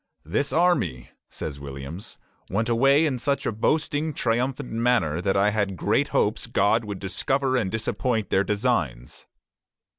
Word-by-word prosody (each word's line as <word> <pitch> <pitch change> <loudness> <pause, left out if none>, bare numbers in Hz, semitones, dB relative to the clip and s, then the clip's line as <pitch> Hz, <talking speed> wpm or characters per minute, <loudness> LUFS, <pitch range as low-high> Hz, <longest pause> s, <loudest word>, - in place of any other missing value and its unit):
"This 110 - -1
army," 165 - +1 0.2
says 70 -2 -6
Williams, 70 +6 -8 0.3
"went 110 +5 0
away 135 +6 +4
in 135 -5 -1
such 140 +3 -1
a - - +1
boasting, 150 +6 0
triumphant 125 +3 -1
manner 115 -9 +1
that 95 +1 +1
I 100 +2 +3
had 100 -3 -1
great - - +1
hopes - - 0
God 110 +3 +2
would 100 -2 -5
discover 130 +7 -1
and 110 -7 +1
disappoint 110 0 -1
their 95 - +3
designs." 95 - -2
110 Hz, 145 wpm, -25 LUFS, 95-130 Hz, 0.3 s, away